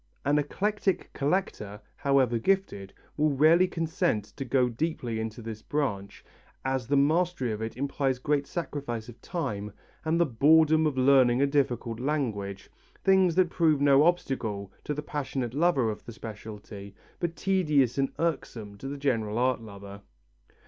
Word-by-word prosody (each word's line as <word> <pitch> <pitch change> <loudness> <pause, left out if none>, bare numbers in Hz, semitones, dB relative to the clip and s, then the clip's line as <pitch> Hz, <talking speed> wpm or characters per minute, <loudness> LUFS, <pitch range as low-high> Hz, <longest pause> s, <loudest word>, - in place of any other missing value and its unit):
An 145 +2 +3
eclectic 195 +6 -1
collector, 140 - -2 0.2
however 130 -4 +2
gifted, 115 - 0 0.3
will 155 +1 +3
rarely 160 +6 +5
consent 165 - -1
to 135 - -4
go 125 0 +2
deeply 120 -3 -3
into 110 +1 -5
this 110 -1 -7
branch, 100 -10 -3 0.4
as 130 -3 -1
the 140 +1 +2
mastery 155 -3 +2
of 105 0 -4
it 110 +1 -5
implies 135 -1 -1
great 145 +2 0
sacrifice 135 -9 -4
of 120 - -13
time 105 - -4 0.3
and 165 +1 +1
the 170 - +5
boredom 155 +4 +4
of 140 -3 -3
learning 130 -2 +5
a 140 - +4
difficult 125 -5 -1
language, 115 -9 -3 0.3
things 190 -3 +4
that 185 -2 +3
prove 160 -4 +3
no 140 -1 +5
obstacle 115 - -1
to 150 - -2
the 150 - -4
passionate 135 -5 -3
lover 140 -7 +2
of 105 - -8
the 120 - -8
speciality, 105 -2 -9 0.2
but 170 -1 -2
tedious 150 -10 +1
and 135 - +1
irksome 115 -11 -3
to 135 - -6
the 140 +1 -5
general 115 -6 -1
art 125 -1 +1
lover. 100 -2 -10
135 Hz, 155 wpm, -28 LUFS, 115-155 Hz, 0.4 s, rarely